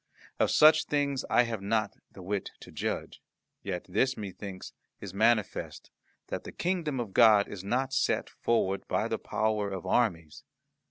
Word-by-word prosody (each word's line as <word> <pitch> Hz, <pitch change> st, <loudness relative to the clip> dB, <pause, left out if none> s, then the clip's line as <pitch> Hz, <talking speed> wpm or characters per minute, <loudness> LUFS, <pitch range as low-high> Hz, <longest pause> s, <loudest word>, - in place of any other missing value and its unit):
Of -, -, +3 dB
such 155 Hz, +1 st, +6 dB
things 140 Hz, -2 st, -1 dB
I 120 Hz, -, +5 dB
have 115 Hz, -4 st, -4 dB
not 110 Hz, +1 st, 0 dB, 0.2 s
the 95 Hz, -, -12 dB
wit 100 Hz, +2 st, -3 dB
to -, -, -12 dB
judge; -, -, -4 dB, 0.4 s
yet 90 Hz, -3 st, -4 dB
this, 130 Hz, +8 st, +1 dB
methinks, 100 Hz, -2 st, -7 dB, 0.3 s
is 95 Hz, -3 st, -8 dB
manifest, 110 Hz, 0 st, 0 dB, 0.4 s
that -, -, -4 dB
the -, -, -8 dB
Kingdom 170 Hz, -7 st, -2 dB
of 110 Hz, -5 st, -4 dB
God 110 Hz, -4 st, +6 dB
is 95 Hz, -2 st, -8 dB
not 130 Hz, +6 st, -1 dB
set 130 Hz, -, +1 dB
forward 100 Hz, -5 st, 0 dB
by -, -, 0 dB
the -, -, -2 dB
power 110 Hz, -2 st, -1 dB
of 95 Hz, -3 st, -6 dB
armies. 85 Hz, -11 st, 0 dB
110 Hz, 160 wpm, -29 LUFS, 95-125 Hz, 0.4 s, such